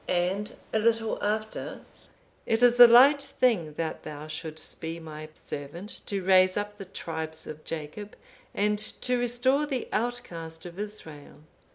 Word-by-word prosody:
'(503) 175 -1 +2
And 205 +2 -4 0.2
a 220 - +3
little 225 0 +1
after, 215 +1 -2 0.7
'It 225 +2 +2
is 245 0 +5
a 240 - +13
light 270 +5 +7
thing 230 - +1
that 160 +1 -3
thou 150 0 -7
shouldst 155 0 -6
be 165 0 -4
my 155 -1 -8
servant 165 +8 -7
to 195 -2 -2
raise 185 0 +5
up 205 0 -3
the 195 - -7
tribes 160 -3 -5
of 155 0 -8
Jacob, 165 +7 -6 0.4
and 210 0 +1
to 245 +3 -1
restore 250 +4 +1
the 265 -4 -2
outcast 170 -9 -3
of 175 +2 -9
Israel. 160 -9 -8
200 Hz, 155 wpm, -28 LUFS, 160-230 Hz, 0.7 s, a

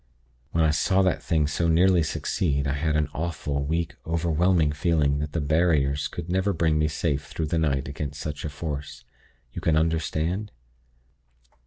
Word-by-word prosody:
When 80 +1 +1
I 80 - +4
saw 95 +5 +2
that 95 - +1
thing 80 -3 +1
so 80 +3 0
nearly 90 +2 +4
succeed, 75 -2 -1
I 70 - 0
had 75 +2 0
an 75 -1 +2
awful, 75 -4 -2
weak, 80 +3 -1
overwhelming 85 0 +2
feeling 75 -2 +1
that 75 0 -4
the 85 - 0
'barriers' 75 -2 +2
could 85 -1 -7
never 95 +3 +1
bring 80 -2 +1
me 75 - +2
safe 75 -2 -2
through 80 - -3
the 85 - +2
night 70 -4 0
against 70 +1 -5
such 75 0 -5
a 75 - -3
Force. 70 -3 -6 0.5
You - - -5
can 80 -1 +2
understand? 80 +5 -1
80 Hz, 170 wpm, -25 LUFS, 75-85 Hz, 0.5 s, I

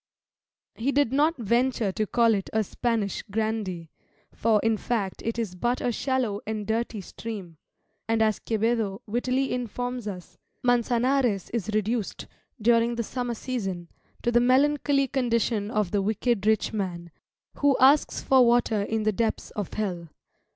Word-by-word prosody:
He 250 +5 -1
did 280 -3 +2
not 300 +4 +3
venture 235 -1 +1
to 215 +2 -2
call 230 0 +3
it 195 -2 -2
a 220 0 +2
Spanish 220 -1 -1
Grandee, 200 -6 -2 0.4
for, 220 -1 +2
in 225 0 +3
fact, 210 -3 -2
it 230 0 -2
is 220 -6 -2
but 240 +7 -1
a 245 - 0
shallow 245 -4 -1
and 215 -1 -3
dirty 220 0 -2
stream; 190 -4 -8 0.5
and 225 0 +1
as 215 -1 +2
Quevedo 225 -1 -1
wittily 255 +4 0
informs 245 -1 -3
us, 180 -4 -8 0.3
"Mançanares 245 -3 +2
is 225 -3 -2
reduced, 215 0 -1 0.3
during 230 +1 +3
the 235 - -1
summer 245 +1 -3
season, 195 -9 -4 0.3
to 240 - +1
the 240 - +5
melancholy 275 +2 +3
condition 235 -5 0
of 210 -5 0
the 205 - +1
wicked 215 +1 0
rich 220 0 +2
man, 175 -5 -4 0.5
who 285 -2 +3
asks 275 +3 +4
for 265 -1 +5
water 235 -3 +3
in 220 +2 -1
the 215 - +2
depths 225 +2 -1
of 205 -4 -4
hell." 180 -6 -3
225 Hz, 150 wpm, -26 LUFS, 205-245 Hz, 0.5 s, the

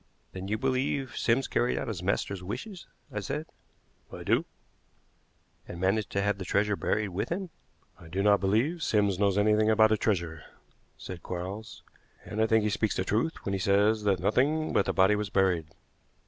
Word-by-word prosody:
"Then 95 0 -6
you 105 +2 -1
believe 130 +1 -1
Sims 125 +3 +1
carried 120 +1 0
out - - -3
his 105 -7 -4
master's 95 0 -1
wishes?" 175 - -7 0.2
I - - -3
said. - - -4 0.7
"I - - -8
do." - - +2 1.2
"And 85 - -8
managed 100 +3 +1
to 100 - +1
have 100 0 0
the - - -4
treasure 105 +3 +1
buried 105 +1 -1
with 95 +2 -3
him?" 180 0 -3 0.5
"I 85 - -13
do 95 +4 -2
not 100 -1 +5
believe 115 - +1
Sims 100 - +1
knows 100 -1 +2
anything 110 +1 +3
about 110 0 +5
a 110 - +3
treasure," 85 -7 -1 0.6
said 90 -2 -8
Quarles; 95 +5 -6 0.4
"and 110 - -3
I 110 - +3
think 110 -1 +3
he 105 - 0
speaks 105 0 0
the - - 0
truth 115 +12 -1
when 100 - -1
he 95 - -1
says 100 +3 +3
that 100 -2 +2
nothing 150 +8 +1
but 100 - +2
the - - +2
body 95 +3 +4
was 105 -1 -2
buried. 95 -5 +1
105 Hz, 190 wpm, -28 LUFS, 95-110 Hz, 1.2 s, not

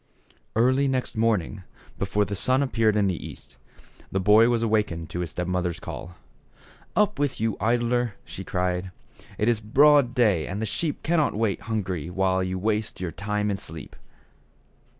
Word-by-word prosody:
Early 130 +5 +3
next 130 -1 -1
morning, 105 -3 0 0.4
before 100 +1 +1
the 100 - -4
sun 130 +7 +2
appeared 115 -5 +2
in 105 - +3
the 95 -4 -1
east, 70 -3 -10 0.5
the 95 - 0
boy 105 +5 +6
was 115 -1 +1
awakened 105 -7 0
by 90 - -3
his 90 -2 -2
step 90 +3 -3
mother's 90 -1 -1
call. 90 0 -8 0.8
"Up 210 -4 +2
with 145 -2 0
you, 110 -1 0
idler," 120 0 +1
she 95 - -8
cried, 90 0 -1 0.5
"it 105 - 0
is 120 -2 +3
broad 135 +3 +4
day 105 -10 +3
and 95 +3 -4
the 110 - -1
sheep 150 +8 -2
cannot 160 -6 +1
wait 105 -2 0
hungry 90 -7 -2
while 95 0 +1
you 95 0 -2
waste 105 +2 -1
your 90 -2 -3
time 105 +3 -2
in 100 - -1
sleep." 80 -4 -7
105 Hz, 170 wpm, -25 LUFS, 95-120 Hz, 0.8 s, boy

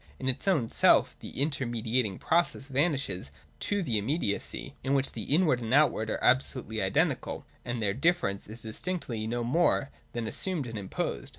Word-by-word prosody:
In 130 - -4
its 130 +8 0
own 155 -12 +3
self - - +4
the - - -9
intermediating 120 -7 0
process 165 -4 +1
vanishes 135 - 0 0.3
to 205 -1 0
the 115 -9 +1
immediacy, 105 -2 -2
in 135 +2 +1
which 135 0 +1
the - - -4
inward 150 -4 +3
and 115 -1 -4
the - - +5
outward 110 -7 +3
are - - -2
absolutely 125 -4 +1
identical 95 0 0 0.2
and 120 -2 -3
their 100 -1 +2
difference 130 - +1
is 110 +3 -8
distinctly 115 -2 -3
no 120 +1 -1
more 140 +1 +2 0.2
than 120 -1 -2
assumed 160 - -2
and 115 -3 -5
imposed. 95 - -3
125 Hz, 170 wpm, -29 LUFS, 110-145 Hz, 0.3 s, the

